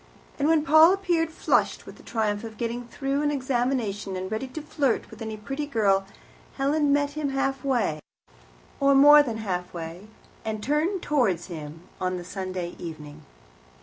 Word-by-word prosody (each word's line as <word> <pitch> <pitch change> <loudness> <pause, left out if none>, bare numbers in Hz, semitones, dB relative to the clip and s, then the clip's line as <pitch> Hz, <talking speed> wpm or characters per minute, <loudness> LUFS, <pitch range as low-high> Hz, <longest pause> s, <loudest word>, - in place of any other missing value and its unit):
And 285 - +2
when 320 -1 +4
Paul 315 +3 +7
appeared, 350 -4 0
flushed 320 - 0
with - - -11
the - - -15
triumph 215 -2 -1
of 220 -1 -8
getting 235 0 -3
through 275 +3 -2
an 295 - +1
examination, 245 -7 -1
and 185 +1 -5
ready 220 +5 -2
to 285 +5 -7
flirt 285 -5 -1
with - - -12
any 220 -1 -5
pretty 275 +7 -4
girl, 195 -7 +2 0.5
Helen 285 +1 +1
met 285 0 +2
him 295 -1 -2
halfway, 270 - 0 0.8
or 275 0 +4
more 295 +2 +9
than 235 -6 -3
halfway, 180 -2 -5 0.4
and 215 -1 -4
turned 320 - 0
towards 215 - +1
him 155 0 -8 0.2
on 185 0 -1
the 175 - -7
Sunday 185 -2 -5
evening. 155 -3 -8
245 Hz, 160 wpm, -26 LUFS, 195-290 Hz, 0.8 s, more